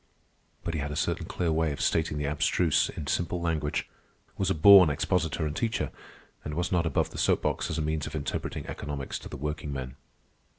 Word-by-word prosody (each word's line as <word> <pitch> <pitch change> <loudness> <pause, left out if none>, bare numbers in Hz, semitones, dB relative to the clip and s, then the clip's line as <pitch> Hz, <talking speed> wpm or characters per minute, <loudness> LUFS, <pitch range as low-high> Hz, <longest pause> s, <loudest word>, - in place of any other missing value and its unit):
But 85 - -3
he 80 - -2
had 75 +1 -3
a 75 - -4
certain - - -1
clear 85 -2 -1
way 80 0 +1
of 70 - -5
stating 80 -2 +1
the 75 - -2
abstruse 80 +2 +2
in 75 - -6
simple 85 +4 -1
language, 80 -3 -1 0.5
was - - 0
a - - +1
born 90 +1 +9
expositor 80 +1 0
and 75 0 -3
teacher, 115 -1 -1 0.5
and 75 0 -5
was 85 +1 -1
not 85 -2 +2
above 75 - 0
the - - -7
soap - - +2
box - - -1
as 85 - -2
a 80 - 0
means 75 -1 -1
of 75 - -7
interpreting 75 - -3
economics 70 -2 -5
to - - -10
the - - -7
workingmen. 70 -3 -4
80 Hz, 205 wpm, -28 LUFS, 75-85 Hz, 0.5 s, born